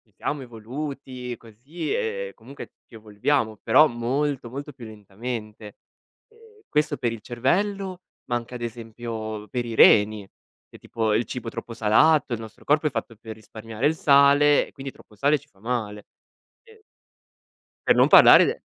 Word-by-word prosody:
siamo 145 -1 -4
evoluti 125 +1 -7
così 125 - -8
e 480 +1 -3
comunque 140 - -12
ci - - -26
evolviamo, 110 +2 -1
però 155 +1 +6
molto 130 +3 -2
molto 140 +3 -8
più 120 -3 -12
lentamente. 110 0 -8 0.5
E 445 -2 -22
questo 150 -1 0
per 120 -2 -1
il 115 -2 -8
cervello, 185 - -2 0.2
ma 120 - -2
anche 120 +1 -5
ad 120 - -8
esempio 115 -2 -6
per 120 +3 -3
i 115 - -5
reni, 105 -2 +5 0.4
che - - -14
tipo 110 -2 -2
il 115 - 0
cibo 125 -2 -6
troppo 115 - -8
salato, 120 +6 +3
il 115 - -3
nostro 110 -1 -12
corpo 150 +1 +1
è - - -2
fatto 115 -3 -5
per 110 +1 -10
risparmiare 110 +3 -4
il 160 - 0
sale 140 0 +4
e - - -17
quindi 135 0 -8
troppo 105 - -20
sale 145 +6 +2
ci - - -23
fa 95 - -29
male. 110 -3 -4 0.6
Sì. 450 -2 -20 1.1
Per - - +5
non - - +5
parlare - - +8
de - - -3
120 Hz, 165 wpm, -24 LUFS, 110-145 Hz, 1.1 s, parlare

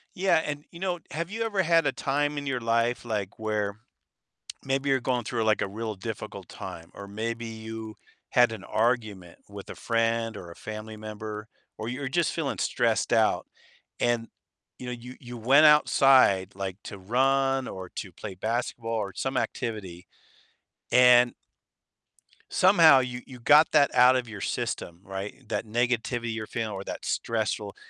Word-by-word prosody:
Yeah, 185 -3 +3
and, 145 0 -4
you 170 - -12
know, 180 -1 -2
have 170 +3 -4
you 225 +2 -3
ever 205 -4 +1
had 165 -2 +3
a 140 - +2
time 145 +2 -1
in 145 0 -4
your 130 -2 -1
life, 115 +1 0
like, 105 -4 -3
where 105 -2 -2 0.9
maybe 135 +1 -1
you're 135 -1 +3
going 125 -1 -1
through, 115 +1 -1
like, 110 -2 +2
a - - -1
real 110 +2 -4
difficult 95 - -7
time, 85 0 -9
or 100 - -9
maybe 115 +3 -4
you 110 -1 -7 0.3
had 120 -2 +4
an 105 -3 -7
argument 110 -7 -1
with 100 -1 -10
a - - -7
friend 115 -1 0
or 85 -3 -9
a 85 - -12
family 110 0 -7
member, 105 0 -7 0.3
or 110 - -5
you're 130 +3 -3
just 170 +5 +1
feeling 155 -5 -2
stressed 115 -3 0
out 110 -2 +3 0.5
and, 120 -1 +1 0.5
you 125 - -8
know, 125 - -4
you 125 +1 -8
you 120 -1 -9
went 135 +7 +6
outside, 135 -10 +5
like, 95 -1 -4
to 100 - -8
run 135 +5 +1
or 95 -1 -7
to 95 -4 -5
play 95 +3 -8
basketball 115 +3 -2
or 100 -3 -3
some 135 +6 -3
activity, 100 -10 -4 0.9
and 125 -1 +6 1.2
somehow 165 -7 +7
you 125 -1 -4
you 125 -2 -12
got 150 +6 +6
that 140 - +5
out 125 +1 +6
of 125 -2 -2
your 105 -3 -8
system, 85 -3 -3
right? 95 +1 -5
That 110 - -2
negativity 120 0 -1
you're 110 -1 -4
feeling 115 0 -3
or 95 0 -6
that - - -6
stressful - - -2
115 Hz, 170 wpm, -27 LUFS, 110-135 Hz, 1.2 s, somehow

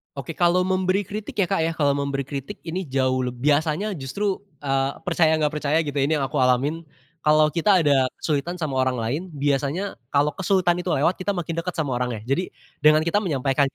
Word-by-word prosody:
Oke, 140 +3 -6
kalau 175 +1 +3
memberi 185 +1 +1
kritik 205 +2 -6
ya - - +3
Kak 195 -4 +1
ya, 165 - 0
kalau 145 -3 +2
memberi 140 -1 -1
kritik 140 0 -6
ini 185 +2 -3
jauh 130 -1 0
leb 125 0 -4
biasanya 160 +7 +1
justru, 135 +9 -5 0.4
eee, 135 -1 0
percaya 165 -2 +3
gak 150 - +3
percaya 150 +1 +1
gitu 145 -2 -5
ya 135 - +3
ini 155 - +1
yang - - +1
aku 150 - -3
alamin, 135 +6 +1 0.4
kalau 155 0 +5
kita 180 +3 +3
ada 140 -3 +3 0.2
kesulitan 155 +3 -1
sama 140 -4 -2
orang 130 0 +2
lain 130 +9 -1
biasanya 145 +6 -1 0.2
kalau 145 +1 +3
kesulitan 180 -2 +2
itu 180 +1 -3
lewat 160 +7 +2
kita 200 +2 -1
makin 170 -2 -4
deket 175 +1 -2
sama 140 -6 -1
orangnya. 125 -3 -2
Jadi 180 +7 +1 0.3
dengan 155 +1 +5
kita 170 +5 +1
menyampaikan, 140 -3 +1
150 Hz, 200 wpm, -23 LUFS, 135-175 Hz, 0.4 s, kalau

